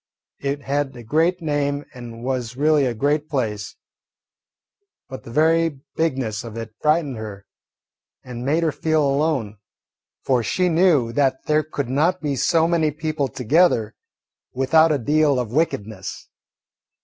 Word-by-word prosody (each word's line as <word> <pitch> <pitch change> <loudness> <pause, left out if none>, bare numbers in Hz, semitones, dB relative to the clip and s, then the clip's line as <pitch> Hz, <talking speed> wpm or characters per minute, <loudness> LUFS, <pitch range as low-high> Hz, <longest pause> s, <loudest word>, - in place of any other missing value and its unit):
It 140 0 -3
had 140 -1 -1
a 120 - -10
great 165 +8 +1
name 145 -1 -1
and 120 -2 -9
was 125 -2 -3
really 150 -1 +3
a 120 - -2
great 145 +5 0
place, 110 -7 -3 1.3
but 130 - -8
the - - -12
very 160 +2 +2 0.2
bigness 130 -9 -1
of 115 -1 -8
it 115 -1 -7
frightened 150 -4 +1
her 105 -3 -8 0.8
and 125 -1 -7
made 155 +6 +1
her 160 - +2
feel 155 0 +1
alone, 135 -7 0 0.7
for 130 -3 +2
she 180 - 0
knew 160 -8 +3
that 135 -1 +1
there 155 0 +3
could 145 -3 -4
not 160 +8 +1
be 145 -3 -2
so 165 +5 +2
many 165 -2 +2
people 155 -1 -2
together 125 -2 +2 0.6
without 155 +5 +4
a 150 - +2
deal 145 +2 +2
of 120 -2 -4
wickedness. 110 - -2
140 Hz, 145 wpm, -22 LUFS, 120-155 Hz, 1.3 s, without